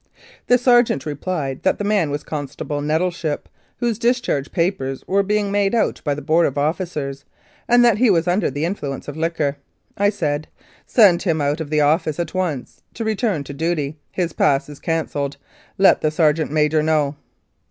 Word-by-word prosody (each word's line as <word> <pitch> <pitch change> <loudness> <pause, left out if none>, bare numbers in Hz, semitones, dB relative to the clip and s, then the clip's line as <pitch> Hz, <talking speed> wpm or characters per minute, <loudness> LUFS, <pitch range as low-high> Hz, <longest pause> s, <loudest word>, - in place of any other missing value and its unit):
The 245 - +5
sergeant 240 - +3
replied 145 -2 -3
that - - +1
the - - -3
man 200 -6 +1
was 145 0 -3
Constable 145 0 -4
Nettleship, 160 0 -1 0.3
whose 235 -3 -1
discharge 235 - 0
papers 165 -7 -1
were 195 +1 +3
being 205 0 0
made 200 +1 +1
out 230 - 0
by 145 -2 0
the 150 - -7
Board 160 +3 +3
of 140 - -5
Officers, 145 -3 -2 0.4
and 240 0 +5
that 225 -3 +4
he 250 -1 +4
was 170 -3 +2
under 180 +4 +2
the 145 +4 -2
influence 145 -7 -4
of 145 - -6
liquor. 160 -3 -1 0.4
I 205 0 +3
said, 155 -7 -2 0.4
"Send 200 -7 +5
him 165 -4 0
out 145 +2 0
of 155 - -5
the 150 0 +2
office 155 +1 +1
at 170 - -3
once 170 -9 -3
to 230 - -3
return 215 - 0
to 140 - -8
duty. 155 -1 -2
His 175 -3 -2
pass 140 -1 +2
is 145 - -10
cancelled. 145 -4 -2 0.4
Let 195 -1 +5
the 155 - +2
sergeant 155 0 +2
major 155 0 +2
know." 150 -2 +1
160 Hz, 180 wpm, -20 LUFS, 145-195 Hz, 0.4 s, The